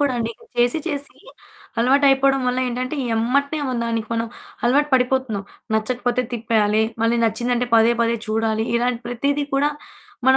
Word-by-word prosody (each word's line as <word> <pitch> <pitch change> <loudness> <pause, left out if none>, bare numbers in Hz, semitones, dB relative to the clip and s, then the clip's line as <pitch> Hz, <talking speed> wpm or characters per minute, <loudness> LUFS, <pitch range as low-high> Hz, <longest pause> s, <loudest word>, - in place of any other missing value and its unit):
కూడా 285 -2 +2
అండి. 230 0 -1 0.3
చేసి 240 +6 +3
చేసి 285 -3 -4 0.6
అలవాటైపోవడం 270 +1 +4
వల్ల 250 - 0
ఏంటంటే 255 +4 -3 0.2
ఎమ్మట్నే 280 +7 +1
మన 250 - -2
దానికి 230 -1 -2
మనం 230 0 -1 0.4
అలవాటు 285 +5 +3
పడిపోతున్నాం. 250 -5 +1 0.3
నచ్చకపోతే 245 +2 0
తిప్పేయాలి. 220 -2 +2 0.2
మళ్ళి 230 +1 +2
నచ్చింది 240 +3 0
అంటే 245 0 -1
పదే 225 +1 +5
పదే 230 0 +1
చూడాలి. 220 0 0
ఇలాంటి 240 0 0
ప్రతిది 280 +4 -1
కూడా 285 +2 +2 0.6
మన 265 - +7
245 Hz, 145 wpm, -21 LUFS, 230-270 Hz, 0.6 s, మన